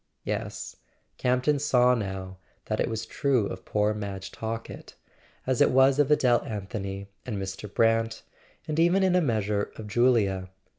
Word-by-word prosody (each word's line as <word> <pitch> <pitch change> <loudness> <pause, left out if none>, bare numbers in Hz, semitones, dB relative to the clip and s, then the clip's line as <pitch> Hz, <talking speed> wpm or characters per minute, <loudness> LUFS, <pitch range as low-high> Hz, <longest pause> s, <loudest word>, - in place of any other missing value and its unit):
Yes; - - -4 0.4
Campton 130 +3 +2
saw 125 -3 +4
now 95 -4 -4 0.3
that - - -2
it - - +1
was 110 0 -3
true 130 -3 +1
of 95 -1 -6
poor 105 0 +1
Madge 100 -2 -6
Talkett, 115 0 -6 0.5
as 130 -1 +1
it - - +6
was 135 +2 +4
of 145 -1 +3
Adele 125 -5 +4
Anthony 100 -2 -5 0.2
and 120 -5 -4
Mr. 95 +1 -6
Brant, 115 0 +1 0.4
and 155 +1 -1
even 175 +4 +4
in 185 -1 +3
a 180 - +4
measure 105 - 0
of 110 - -8
Julia. 105 -5 +2
115 Hz, 155 wpm, -27 LUFS, 100-130 Hz, 0.5 s, it